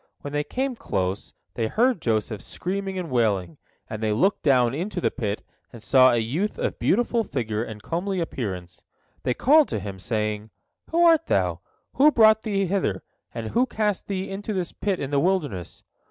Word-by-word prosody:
When 145 - -7
they 145 0 0
came 260 - -2
close, 95 - -3 0.2
they 115 -2 -1
heard 240 - +2
Joseph 110 -2 -1
screaming 195 +1 -4
and 175 -5 -4
wailing, 100 -9 0 0.3
and 110 - -6
they 110 -1 +1
looked 190 - +2
down 125 -4 +3
into 180 +6 -3
the - - +1
pit 105 -5 -3 0.3
and 115 -3 -12
saw 130 +3 +6
a 120 - +2
youth 145 - -1
of - - -2
beautiful 235 +2 +2
figure 115 - -2
and 110 -3 -8
comely 185 +3 -2
appearance. 95 - -5 0.4
They 125 - -1
called 300 +3 +5
to - - -3
him, 95 -1 -7
saying: 105 +1 -2 0.4
"Who 340 +1 +3
art 330 -1 +5
thou? - - +1 0.4
Who 290 +3 +7
brought 220 -5 +5
thee 200 -3 0
hither, 175 - -1 0.3
and 110 -1 -5
who 250 +2 +2
cast 210 -4 -1
thee 190 -1 -3
into 205 +2 -4
this 180 -3 -2
pit 195 -3 -2
in 140 0 -4
the 140 - +3
wilderness?" 145 - -1
145 Hz, 185 wpm, -24 LUFS, -, 0.4 s, Who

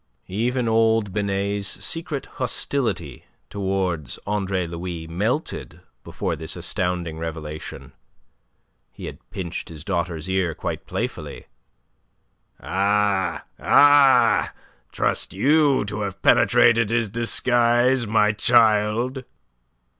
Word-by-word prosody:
Even 120 +5 -1
old 110 -3 +2
Binet's 100 -1 -1
secret 165 -4 -4 0.2
hostility 110 - -2 0.3
towards 95 -7 -2
Andre 95 -3 -1
Louis 85 0 -6
melted 105 - -3 0.2
before - - -3
this - - -3
astounding 90 -3 -2
revelation. 80 -2 -7 1.0
He - - -10
had - - -8
pinched 85 -3 -6
his 80 -2 -9
daughter's 85 -3 -3
ear 95 -4 0
quite - - -5
playfully. - - -5 1.1
"Ah, 100 -1 0 0.2
ah, 135 -5 +5 0.4
trust - - -1
you 140 +2 +3
to 105 +1 -4
have 100 -2 -4
penetrated 120 -1 +4
his 115 -1 +1
disguise, 120 +1 +2
my 105 0 +3
child!" 115 +3 +2
105 Hz, 95 wpm, -23 LUFS, 90-120 Hz, 1.1 s, ah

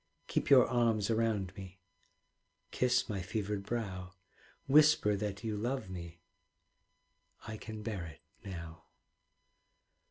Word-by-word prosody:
Keep - - -1
your 130 -3 +8
arms 115 -3 +2
around 110 -4 0
me, 95 -1 -10 0.9
Kiss 125 -1 +2
my 100 -4 -3
fevered 105 +2 -2
brow, 95 -4 -4 0.5
Whisper 145 -7 +5
that 105 +1 -4
you 110 -2 -2
love 115 -1 -2
me 85 -2 -8 1.3
I 110 - -5
can 110 -1 -8
bear 105 -6 -3
it 80 - -13 0.2
now. 85 -4 -8
105 Hz, 115 wpm, -33 LUFS, 95-115 Hz, 1.3 s, your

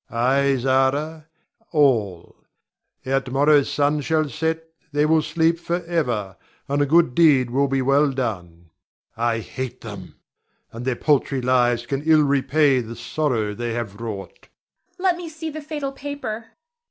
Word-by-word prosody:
Ay, 135 +3 +2
Zara, 135 +5 0 0.4
all; 115 - +1 0.7
ere 135 +1 +1
to 135 - -10
morrow's 145 +2 +3
sun 145 +1 +1
shall 155 +1 +1
set 160 +2 -2 0.3
they 145 +1 +2
will 160 0 +3
sleep 165 +1 +1
forever, 165 - -2 0.3
and 140 +1 0
a 145 - +2
good 160 -3 +4
deed 135 -6 +4
will 140 +3 +2
be 135 -1 0
well 140 +2 +3
done. 90 -10 -5 0.4
I 115 0 0
hate 130 +2 -6
them, 100 -5 -9 0.6
and 115 +2 -7
their 130 -2 0
paltry 140 -1 +1
lives 120 -1 +2
can 135 +2 -2
ill 155 0 +4
repay 140 -1 +2
the 115 0 -8
sorrow 115 -3 -1
they 120 +1 -4
have 115 -3 -5
wrought. 105 -4 -7 0.5
Zara. 365 - -10
Let 350 - +1
me 350 -2 -7
see 315 0 -6
the 310 +1 -7
fatal 295 -2 -4
paper. 270 -6 -6
140 Hz, 155 wpm, -22 LUFS, 120-160 Hz, 0.7 s, good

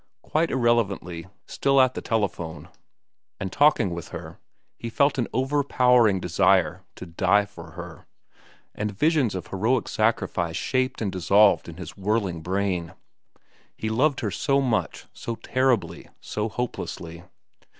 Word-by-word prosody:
Quite 160 +2 0
irrelevantly, 100 -9 0 0.2
still 135 0 +1
at 130 -1 +4
the - - -5
telephone 100 -8 -3 0.7
and 95 - -4
talking 145 -9 +3
with 85 -1 -6
her, - - -9 0.4
he 115 - -6
felt 140 +4 +2
an 120 - 0
overpowering 125 -5 +3
desire 90 0 +2
to - - -8
die 95 +4 +2
for 85 -5 -12
her, - - -10 0.7
and 105 -2 -4
visions 150 - +2
of 95 - -4
heroic 110 +5 0
sacrifice 95 -6 0
shaped 130 -2 -1
and 100 - -1
dissolved 100 +2 +4
in 80 - -10
his 90 -3 -8
whirling 100 -4 -1
brain. 90 -1 -2 0.8
He 110 - -3
loved 135 +5 +1
her 105 - -2
so 140 +8 +1
much, 125 -5 -1
so 115 - -5
terribly, 115 -11 0
so 105 +1 -3
hopelessly. 85 -8 -5
105 Hz, 135 wpm, -25 LUFS, 90-125 Hz, 0.8 s, at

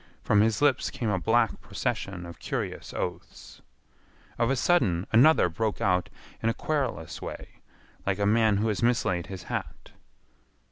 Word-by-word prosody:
From 105 - +4
his 110 +4 +1
lips 145 -3 +3
came 115 -4 -2
a 95 - 0
black 115 +4 +1
procession 90 -3 -3
of 85 - -10
curious - - -4
oaths. 90 -1 -6 0.8
Of 115 - +2
a 135 - +2
sudden 100 - +2
another 130 - +6
broke 105 +5 -2
out 90 -2 +1 0.3
in 115 - +1
a 115 - -1
querulous 135 - -2
way - - -8 0.4
like 95 -1 0
a 100 - 0
man 110 0 +3
who 110 +3 0
has 105 - -1
mislaid 95 -7 +1
his 95 -2 -7
hat. - - -6
105 Hz, 155 wpm, -27 LUFS, 90-115 Hz, 0.8 s, another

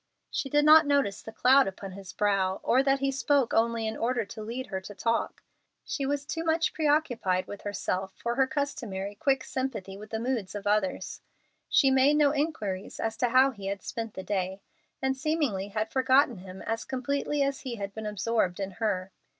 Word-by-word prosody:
She 270 - -2
did 295 +2 +3
not 310 0 +8
notice 280 -9 +1
the 220 - -9
cloud 260 +3 +5
upon 195 0 -6
his 190 -1 -9
brow, 195 -1 +1
or 255 - +4
that 275 0 +2
he 275 0 +1
spoke 275 -1 +1
only 230 0 +2
in 220 - -2
order 235 -1 0
to 215 +2 -9
lead 235 +4 -4
her 190 - -1
to 205 +2 -10
talk. 230 +4 -1 0.4
She 275 -2 -3
was 285 0 -1
too 325 +2 -3
much 325 0 +1
preoccupied 270 - +1
with 205 - -8
herself 190 -2 -2
for 235 - -2
her 265 +1 +3
customary 245 -8 -3
quick 265 +5 +1
sympathy 225 -8 -4
with 215 +1 -10
the 220 - -2
moods 230 -5 -2
of 205 -1 -5
others. 205 -2 0 0.5
She 270 -2 +5
made 265 +3 +5
no 295 -2 +4
inquiries 250 -11 -3
as 225 0 -1
to 245 - +1
how 260 +3 +5
he 200 -6 -8
had 200 0 -3
spent 225 -2 -5
the 190 - -5
day, 190 0 -2 0.4
and 265 0 +1
seemingly 275 -9 -1
had 215 +2 -3
forgotten 260 -3 +3
him 185 0 -10
as 225 0 -2
completely 280 +2 -1
as 275 0 -1
he 255 -3 -5
had 200 -2 -5
been 220 0 -5
absorbed 210 -2 0
in 195 0 -3
her. 195 -3 -1
230 Hz, 200 wpm, -28 LUFS, 200-275 Hz, 0.5 s, not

